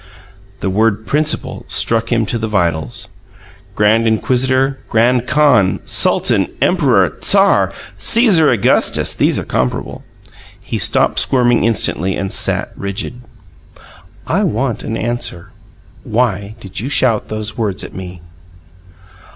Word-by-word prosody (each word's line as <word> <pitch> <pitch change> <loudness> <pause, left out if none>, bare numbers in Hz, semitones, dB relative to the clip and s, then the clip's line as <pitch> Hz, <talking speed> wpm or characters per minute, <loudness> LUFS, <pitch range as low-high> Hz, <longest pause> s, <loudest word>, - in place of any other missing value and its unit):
The 95 - -1
word 110 +1 0
"principal" 150 +4 -1
struck 115 +1 0
him 115 -2 +1
to 115 +2 -3
the 110 - -3
vitals. 85 0 -2 0.7
Grand 110 +2 +2
Inquisitor, 130 +4 +1
Grand 120 +2 +2
Khan, 140 -11 +3
Sultan, - - +2
Emperor, 130 - +2
Tsar, - - +3 0.3
Caesar 195 - +4
Augustus 115 -5 +2
these - - +1
are - - -4
comparable. 65 -1 -3 0.6
He - - -5
stopped - - +2
squirming 120 -3 +2
instantly, 95 -5 +1
and 95 -1 -4
sat - - +2
rigid. 100 +5 -5 1.0
"I - - 0
want 120 +1 -2
an 115 - -4
answer. 115 -7 -4 0.5
Why 105 -3 -1
did 95 -4 -8
you 125 +6 -4
shout 125 -6 +1
those 110 0 -5
words 105 -5 -3
at - - -9
me?" 90 -2 -9
115 Hz, 120 wpm, -15 LUFS, 100-125 Hz, 1.0 s, Caesar